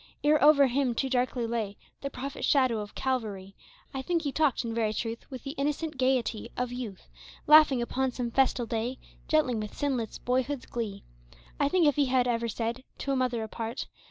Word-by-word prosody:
Ere 300 0 +4
over 290 -2 +7
him 260 -1 +1
too 265 +2 -1
darkly 250 -1 +1
lay 225 -3 -2 0.2
The 275 - -3
prophet 275 +1 -6
shadow 255 -6 +3
of 205 -1 -7
Calvary, 210 -7 -2 0.4
I 265 - -3
think 335 +4 0
he 285 - -1
talked 280 -5 +1
in 230 - -3
very 220 -2 0
truth 230 +1 -4
With 260 -3 -8
the 275 - -4
innocent 300 +2 -1
gayety 255 -4 0
of 250 0 -1
youth, 240 -6 -6 0.4
Laughing 300 -5 +7
upon 265 +2 0
some 240 -1 -3
festal 255 -1 +2
day, 230 +3 -2 0.3
Gently, 310 -5 +3
with 215 -2 -4
sinless 255 -6 -1
boyhood's 260 +2 -1
glee. 210 -4 -4 0.6
I 285 - +3
think 355 +1 +3
if 290 0 +3
he 285 - +4
had 250 -1 +2
ever 235 -1 0
said 230 +3 -3
To 275 - -3
a - - +2
mother 250 -3 0
apart. 225 +3 -4
250 Hz, 190 wpm, -29 LUFS, 230-275 Hz, 0.6 s, over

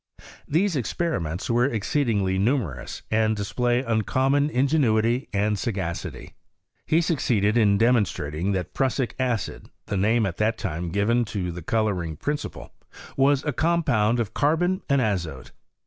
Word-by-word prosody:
These 175 +4 +1
experiments 105 - -2
were 120 +3 +2
ex 110 -6 -3
ceedingly 105 -10 +1
numerous, 100 - -1
and 110 0 +2
dsplaj 120 +4 0
uncommon 130 +6 +1
in 130 -2 +2
genuity 120 -4 +2
and 105 0 0
sagacity. 95 -7 -4 0.5
He 155 - +3
suc^eded 120 - +1
in 105 -4 +4
demon 115 0 +4
strating 75 +4 -3
that 90 -2 -3
prussic 130 -1 0
acid, 125 -6 -2 0.2
the 100 - -2
name 110 +4 +2
at 90 -3 -4
that 110 +1 +1
time 85 -1 -3
given 105 +6 +2
to 95 -4 -3
the 90 +1 -7
colouring 90 -4 -1
principle, 145 - -4 0.4
was 140 0 +3
a 150 - -1
compound 125 -10 +2
of 110 -2 -2
carbon 175 +6 +1
and 140 -1 +3
azote. 85 - -2
110 Hz, 145 wpm, -24 LUFS, 100-135 Hz, 0.5 s, in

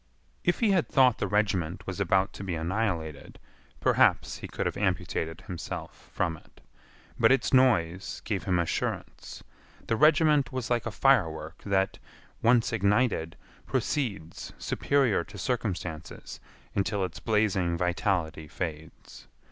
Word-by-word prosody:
If 175 - +1
he 220 -3 +4
had 185 -4 +2
thought 130 -4 +4
the - - 0
regiment 95 -4 0
was 95 0 -5
about 95 0 +2
to - - -8
be 95 -3 -3
annihilated 80 -3 -3 0.4
perhaps - - +3
he - - -7
could - - -4
have - - -1
amputated 80 +2 -2
himself 90 -2 -7
from 80 -1 -1
it. - - -22 0.6
But 115 +1 +5
its 135 - +2
noise 95 -9 +2
gave 105 -3 -2
him 90 -2 +1
assurance. 85 -1 -3 0.4
The 115 - 0
regiment 150 -1 +4
was 130 -2 -4
like 120 -2 +1
a - - -1
firework 85 - +1
that, 95 -1 +1 0.4
once 115 0 +3
ignited, 100 -5 +1 0.3
proceeds 100 - -2
superior 135 -11 +1
to - - -12
circumstances 95 - -4 0.3
until 100 0 0
its 90 - -8
blazing 100 -6 +1
vitality 90 -3 -1
fades. 80 0 -7
100 Hz, 130 wpm, -28 LUFS, 85-120 Hz, 0.6 s, But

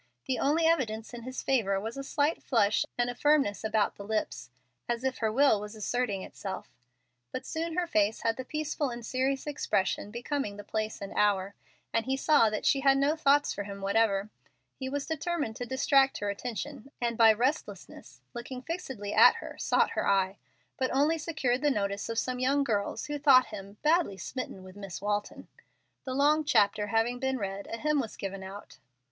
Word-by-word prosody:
The 260 -2 -1
only 315 +4 +2
evidence 235 -9 0
in 240 - -7
his 255 +2 -6
favor 205 -8 +1
was 225 +3 -5
a 275 - -5
slight 290 +3 0
flush 215 -5 +2
and 240 0 +2
a 245 - -2
firmness 275 -6 +2
about 220 -1 +1
the 200 - -7
lips, 205 - -3 0.4
as 240 +1 -1
if 265 -1 -1
her 220 -2 +1
will 255 -3 +4
was 210 +1 -7
asserting 215 -2 -1
itself. 190 -8 -7 0.6
But 260 - -5
soon 325 0 -3
her 360 -1 +1
face 215 -8 +1
had 225 0 +1
the 260 - -5
peaceful 305 0 -2
and 235 -1 -7
serious 265 +3 -1
expression 205 -9 -1
becoming 235 -1 -3
the 205 - -8
place 215 0 -3
and 195 - -7
hour, 200 -1 +2 0.4
and 230 +2 0
he 265 0 +1
saw 275 -5 +4
that 215 - -3
she 275 - +4
had 270 0 +4
no 280 +3 +2
thoughts 290 -2 +3
for 200 - -5
him 200 0 -7
whatever. 200 0 +1 0.4
He 260 -1 -5
was 280 +1 -3
determined 320 -6 -2
to 245 - -5
distract 270 +1 +3
her 205 0 -2
attention, 250 +5 -6
and 235 -1 -1
by 225 -1 +7
restlessness, 255 +8 -3
by 240 - -5
looking 250 +1 -7
fixedly 265 - -5
at - - +8
her, - - -8
sought - - +2
her - - -1
eye, 195 0 +2 0.4
but 260 -1 0
only 300 +5 +2
secured 270 -6 -1
the 295 - +3
notice 200 -5 -1
of 230 - -3
some 250 +2 -1
young 275 +3 +2
girls 205 -6 -1
who 295 0 -4
thought 270 -3 +6
him 200 0 -8
"badly 310 - +2
smitten 195 -1 -6
with 185 0 -12
Miss 195 -3 -7
Walton." 205 +1 -3 0.6
The 260 -1 -3
long 300 +3 +4
chapter 210 -6 +3
having 225 +3 +1
been 265 0 0
read, 200 -2 -4
a 230 - -3
hymn 300 +2 +1
was 230 -5 -4
given 195 0 -5
out. 195 +2 -10
240 Hz, 195 wpm, -29 LUFS, 205-275 Hz, 0.6 s, at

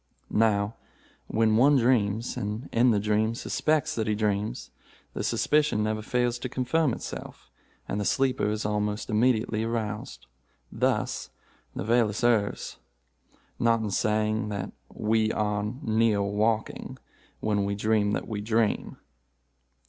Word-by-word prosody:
Now, 105 -1 +2 0.5
when 110 -1 +2
one 140 +5 +6
dreams, 115 -2 +1
and, 105 +5 -4
in 120 +2 +4
the 105 -3 +3
dream, 110 +2 +1
suspects 155 +5 0
that 110 -5 -2
he 105 - +1
dreams, 105 0 -2 0.4
the - - -3
suspicion 150 -8 +2
never 110 0 -1
fails 120 +2 0
to 130 - -4
confirm 135 +4 +1
itself, - - -8 0.4
and 105 - -2
the - - -2
sleeper 130 +1 +1
is 105 0 -2
almost 105 +1 -1
immediately 110 -1 +2
aroused. 105 - -4 0.5
Thus - - -1 0.5
Novalis 115 +1 +1
errs 110 -4 +1 0.8
not 115 -1 +3
in 105 -2 -2
saying 110 +1 0
that 100 -2 -4 0.2
'we 110 0 +1
are 105 -1 -1
near 110 -3 +2
waking 110 +2 -1 0.4
when 105 -2 0
we 100 0 -1
dream 105 0 +1
that - - -2
we 105 -3 -3
dream. 110 0 0
110 Hz, 130 wpm, -27 LUFS, 105-115 Hz, 0.8 s, one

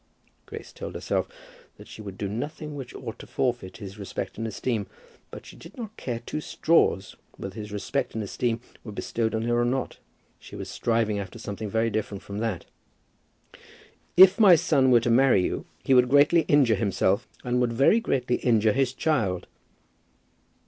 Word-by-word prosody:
Grace - - -9
told - - -7
herself - - -1 0.5
that - - -13
she - - -10
would 100 -2 -8
do 100 - -3
nothing 150 +8 -5
which 130 -4 -8
ought 115 -4 -7
to - - -10
forfeit 120 -8 -2
his 100 -2 -9
respect 100 +2 -5
and 115 - -2
esteem, 110 0 -2 0.4
but - - -10
that - - -21
she - - -12
did - - -14
not 220 -3 -7
care 120 -3 -4
two 150 +6 -5
straws 150 - +1 0.2
whether 95 - -6
his 105 0 -7
respect 110 +7 -3
and 110 - -2
esteem 115 +3 -2 0.2
were 110 - -8
bestowed 110 +2 -2
on 110 - -1
her 120 +1 +1
or - - +2
not. 125 +2 -2 0.4
She - - -12
was - - -6
striving 115 -3 0
after 100 +3 -7
something 105 -1 -6
very 115 +2 0
different 105 -2 -3
from 100 +1 -6
that. 110 -6 -2 1.5
"If 190 +2 +8
my 195 -5 +8
son 135 -4 +3
were 120 -2 +6
to 120 - 0
marry 120 -6 +5
you, - - -3 0.2
he 135 - +2
would 125 -1 +5
greatly 145 +4 +5
injure 140 -6 +4
himself, 100 +2 +1 0.2
and 125 0 0
would 120 -1 +1
very 135 - +4
greatly 125 - 0
injure 110 -3 +2
his 135 0 +1
child." 110 - 0
115 Hz, 185 wpm, -26 LUFS, 105-135 Hz, 1.5 s, If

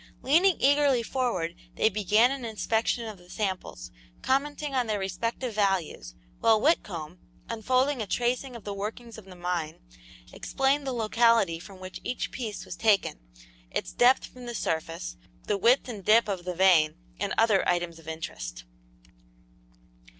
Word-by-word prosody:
Leaning 340 +7 +4
eagerly 280 -3 +4
forward, 225 -10 -1 0.2
they - - +3
began 215 +3 +3
an 275 -2 -4
inspection 225 +1 -1
of 215 -4 -8
the 175 0 -19
samples, 185 - -4 0.3
commenting 290 +2 0
on 250 -3 +1
their 215 -1 0
respective 225 +6 -3
values, 190 - -1 0.2
while 225 -1 +4
Whitcomb, 180 - 0 0.3
unfolding 255 +4 +1
a 210 - -3
tracing 245 +4 -1
of 235 - -9
the 205 - -4
workings 220 +3 -6
of 210 - -15
the 185 -1 -12
mine, 175 -3 -3 0.5
explained 275 +1 0
the - - 0
locality 230 -6 +3
from 190 +2 -12
which 185 0 -8
each 250 - -3
piece 220 -5 -5
was - - -7
taken, 205 - +2 0.5
its - - -4
depth 250 +2 +4
from 250 -1 -12
the 240 - -5
surface, 160 - -3 0.3
the 205 - 0
width 235 +8 +3
and 215 -6 -7
dip 220 +4 +5
of 190 -4 -3
the 180 -1 -3
vein, 170 -4 +5 0.2
and - - -2
other 220 -4 +4
items 175 -2 -1
of 160 - -17
interest. - - -6
215 Hz, 155 wpm, -27 LUFS, 180-245 Hz, 0.5 s, dip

